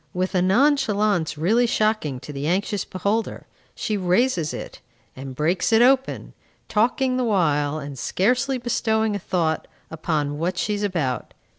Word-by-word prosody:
With 185 +2 -1
a 180 - +2
nonchalance 210 - +2
really 220 +10 +2
shocking 215 - 0
to 150 - -8
the 140 +1 -3
anxious 195 +3 0
beholder, 205 +4 -2 0.3
she 215 - -2
raises 180 -2 +1
it, - - -7 0.4
and 130 0 -8
breaks 170 - 0
it 225 +1 +6
open, 265 +1 +1 0.3
talking 255 +4 +1
the 255 - +1
while, 155 -9 +1
and 140 -3 -7
scarcely 250 - +1
bestowing 220 -3 0
a - - -2
thought 170 -4 -1 0.2
upon 150 -2 -2
what 175 +2 -1
she 210 - 0
is 205 - -3
about. 165 -11 -2
190 Hz, 150 wpm, -23 LUFS, 160-225 Hz, 0.4 s, it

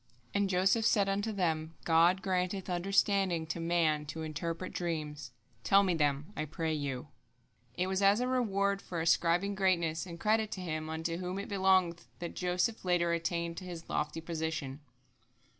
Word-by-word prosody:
And 200 -1 +1
Joseph 190 +5 +3
said 205 -2 +3
unto 200 +3 0
them: 165 -5 -1
"God 170 +3 +4
granteth 185 0 -1
understanding 195 -1 +2
to 170 +1 -4
man 165 -3 +1
to 160 +2 -5
interpret 165 +3 -4
dreams. 150 -6 -4 0.3
Tell 195 +8 +5
them 180 -2 +1 0.2
me, 140 - -10
I 155 - -2
pray 160 +1 -2
you." 145 -1 -3 0.7
It 180 - 0
was 190 +1 -1
as 200 +2 +5
a 250 - 0
reward 200 -6 +1
for 170 - -5
ascribing 170 +4 +2
greatness 175 -4 +1
and 170 -1 -8
credit 215 +2 +2
to 190 - -6
Him 155 -3 -3
unto 165 +1 -2
whom 180 +1 -4
it 200 - -5
belongeth 190 -3 +2
that 170 - -5
Joseph 180 +5 0
later 175 -2 +2
attained 170 0 -2
to 185 - -6
his 175 -2 -8
lofty 150 +2 -1
position. 160 -4 -3
175 Hz, 165 wpm, -32 LUFS, 160-195 Hz, 0.7 s, Tell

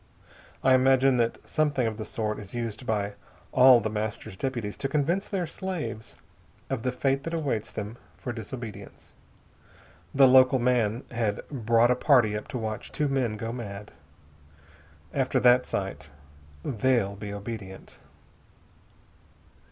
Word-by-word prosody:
I 130 - +5
imagine 130 0 +4
that 115 -1 -1
something 145 -5 +1
of 110 -1 -2
the 110 - -5
sort 110 -3 -3
is 105 +2 -9
used 120 +1 -4
by 105 -2 -1 0.4
all 130 -1 +7
The 110 -1 -2
Master's 105 -3 -4
deputies 120 -2 -3
to 135 - -2
convince 165 +8 0
their 190 -3 -1
slaves 165 - -5 0.6
of 130 -4 -1
the 125 - -1
fate 135 +1 0
that 165 0 -3
awaits 135 -9 -2
them 105 +2 -6 0.2
for 120 - -5
disobedience. 115 -1 -9 1.0
The 135 -1 +6
local 130 +1 +6
man 120 -2 +1
had 115 -4 -2
brought 115 -2 +3
a - - +4
party 125 -6 +4
up 105 - -5
to - - -5
watch 110 -2 -4
two 150 - 0
men 125 -6 0
go 115 +2 -4
mad. 105 -4 -7 1.2
After 135 -2 +1
that 125 0 +5
sight 95 -6 -4 0.6
they'll 115 -5 +1
be 100 0 -7
obedient." 100 -2 -8
120 Hz, 140 wpm, -27 LUFS, 105-130 Hz, 1.2 s, all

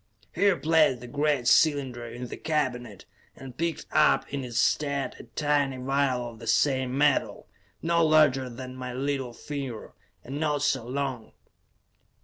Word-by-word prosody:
He 200 +4 +3
replaced 160 -7 +3
the 125 - -10
great 145 -1 0
cylinder 135 -6 +3
in 120 +2 -7
the - - -7
cabinet, 125 - -3 0.3
and 130 -2 -11
picked 165 +2 -2
up 155 -1 +3
in 140 -1 -2
its 120 -2 -5
stead 140 -3 0
a - - -10
tiny 145 -3 +1
vial 130 -1 0
of 115 -1 -11
the 115 - -10
same 130 -1 +1
metal, 145 -1 +1 0.4
no 170 0 +2
larger 150 -5 +4
than 130 +1 -8
my 125 -1 -6
little 135 -1 -2
finger, 135 -5 -6 0.3
and 135 +3 -6
not 150 -2 0
so 130 -5 0
long. 130 -3 -4
135 Hz, 150 wpm, -27 LUFS, 125-150 Hz, 0.4 s, larger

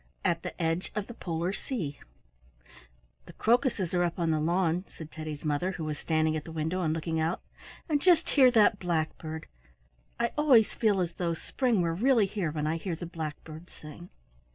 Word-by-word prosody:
AT - - +1
THE - - -7
EDGE 165 +2 -1
OF 210 -2 -1
THE 240 - -9
POLAR 175 -3 -2
SEA 175 - -4 1.3
The - - -11
crocuses 230 - +1
are 175 - +2
up 175 -1 0
on 170 -2 +1
the 155 - +1
lawn," 170 +2 +1
said 160 -1 -11
Teddy's 155 -1 -6
mother, 150 +6 0
who 165 - -5
was 150 -1 -3
standing 155 -1 +1
at 155 - -3
the 165 - -9
window 160 +3 -2
and 160 -3 +1
looking 160 0 -2
out. 165 +3 0 0.5
"And 295 -3 +1
just 345 -2 +4
hear 265 -3 +7
that 215 -4 +4
blackbird! 160 -2 -2 0.7
I 235 0 +1
always 255 -8 +5
feel 205 -4 +2
as 170 -1 -2
though 170 -2 -1
spring 235 +1 0
were 165 -1 0
really 230 +3 +3
here 195 -4 -2
when 150 0 -3
I 160 +2 0
hear 170 0 -3
the 175 - -6
blackbirds 160 0 -7
sing." 155 +4 -11
170 Hz, 190 wpm, -29 LUFS, 160-205 Hz, 1.3 s, hear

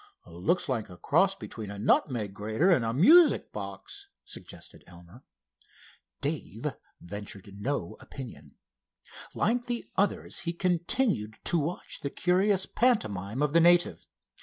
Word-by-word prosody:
"Looks 90 - 0
like 115 -6 -2
a 90 - -11
cross - - +3
between 105 -2 -8
a 100 - -7
nutmeg 110 -1 +1
grater 110 - +1
and 155 -9 +4
a 115 - 0
music 300 - +6
box," 400 0 -7 0.2
suggested - - -8
Elmer. 90 +6 -15 1.0
Dave - - -4 0.3
ventured 100 +1 -8
no 120 -6 -3
opinion. 80 - -10 0.8
Like 240 +3 +1
the 240 -1 -2
others 200 0 0
he 170 0 -3
continued 175 - 0
to 170 - +2
watch 160 +4 -4
the 140 - -3
curious 185 +4 +2
pantomime 115 - 0
of 150 0 0
the 170 - +6
native. 175 +1 +4
145 Hz, 130 wpm, -29 LUFS, -, 1.0 s, music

